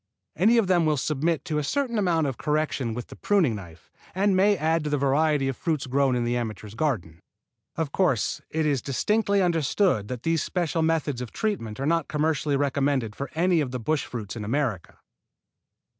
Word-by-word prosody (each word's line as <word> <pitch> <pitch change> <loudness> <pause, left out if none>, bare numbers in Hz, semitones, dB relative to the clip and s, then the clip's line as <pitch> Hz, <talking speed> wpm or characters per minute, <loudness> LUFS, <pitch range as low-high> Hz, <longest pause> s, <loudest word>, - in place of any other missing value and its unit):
Any 220 +8 +4
of 230 - +4
them 175 -3 +3
will 150 -1 +2
submit 155 +2 -1
to 150 -1 -1
a - - -2
certain 235 - -1
amount 170 -5 +2
of 135 -4 -3
correction 150 -6 -1
with 125 - -6
the - - -10
pruning 185 - +2
knife, 85 -6 -10 0.2
and 195 +1 +2
may 200 +2 +4
add 160 0 +1
to 150 - -2
the 145 - +1
variety 140 +1 +2
of 135 - -1
fruits 155 -1 -2
grown 135 0 +2
in 120 - 0
the 120 +1 0
amateur's 110 -3 -4
garden. 110 - -2 0.6
Of 160 -4 -2
course, 135 - +1
it 160 0 -1
is 140 -4 +1
distinctly 200 - +1
understood 165 - +1
that 125 0 -6
these 165 -1 +1
special 170 -2 -1
methods 155 -5 0
of 125 - -5
treatment 130 - -3
are 135 - -2
not 165 0 +1
commercially 150 -1 0
recommended 135 -5 0
for 140 - -5
any 170 0 +3
of 140 - -2
the 125 0 -4
bush 150 +6 -1
fruits 105 -4 -6
in 110 - -5
America. 115 - -2
150 Hz, 195 wpm, -25 LUFS, 125-165 Hz, 0.6 s, Any